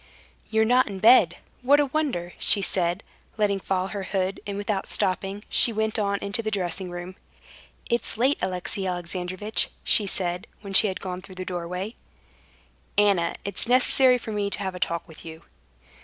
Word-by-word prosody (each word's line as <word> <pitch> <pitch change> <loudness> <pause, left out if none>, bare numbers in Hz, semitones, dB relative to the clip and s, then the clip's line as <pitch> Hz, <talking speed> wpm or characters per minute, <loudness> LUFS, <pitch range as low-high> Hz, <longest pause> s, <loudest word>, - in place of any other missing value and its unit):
"You're 220 0 +2
not 250 +3 +3
in 200 -2 -6
bed? 200 -4 +5 0.2
What 280 +4 +4
a 290 - +3
wonder!" 265 - -2
she 200 - +5
said, 180 +1 0 0.3
letting 205 -2 +1
fall 190 0 -2
her 200 0 -4
hood, 190 0 -2
and 200 -1 -4
without 205 -1 -2
stopping, 195 +2 -1
she 235 - +4
went 220 0 -1
on 200 -1 0
into 200 +3 -2
the 220 - -2
dressing 185 -2 -2
room. 175 +1 -7 0.7
"It's 235 -2 -1
late, 260 +5 +2
Alexey 185 +1 -2
Alexandrovitch," 180 +3 -2
she 210 - +4
said, 180 -1 -3
when 200 -2 -8
she 210 - +8
had 190 - -4
gone 180 -1 -5
through 190 -1 -13
the 185 0 -6
doorway. 180 +4 -4 1.0
"Anna, 200 -5 +3
it's 200 +3 -1
necessary 255 +1 +4
for 230 -2 -7
me 205 -1 -1
to - - 0
have 190 -1 -3
a 180 - -8
talk 170 -1 -2
with 160 -2 -12
you." 160 -1 -10
195 Hz, 175 wpm, -25 LUFS, 180-220 Hz, 1.0 s, she